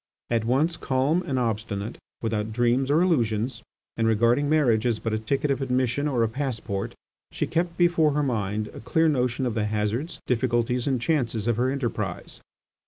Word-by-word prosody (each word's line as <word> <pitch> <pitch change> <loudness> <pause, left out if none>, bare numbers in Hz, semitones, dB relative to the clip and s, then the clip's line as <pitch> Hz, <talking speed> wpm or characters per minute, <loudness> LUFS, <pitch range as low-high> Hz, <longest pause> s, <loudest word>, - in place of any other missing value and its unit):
At 115 -2 +1
once 150 +8 +1
calm 135 +6 +1
and 135 - -1
obstinate, 110 -3 -2 0.2
without 110 -1 -1
dreams 120 +3 +1
or 155 +4 +4
illusions, 120 - 0 0.3
and 115 -1 +1
regarding 120 +6 +3
marriage 130 -8 +3
as 115 -3 +1
but 115 0 -3
a 110 - 0
ticket 140 +6 0
of 135 - -1
admission 130 +2 0
or 125 -5 +1
a - - +3
passport, 115 -5 -3 0.4
she - - -1
kept 170 +1 -1
before 170 -4 +3
her 150 +1 +1
mind 105 -4 -1
a - - -8
clear 160 +8 +2
notion 125 -3 +1
of 120 - -1
the 110 -1 0
hazards, 105 +8 -2
difficulties, 125 0 0
and 130 -3 +1
chances 120 -6 0
of 120 -2 +1
her 125 +2 +2
enterprise. 115 -9 -3
125 Hz, 175 wpm, -25 LUFS, 110-140 Hz, 0.4 s, or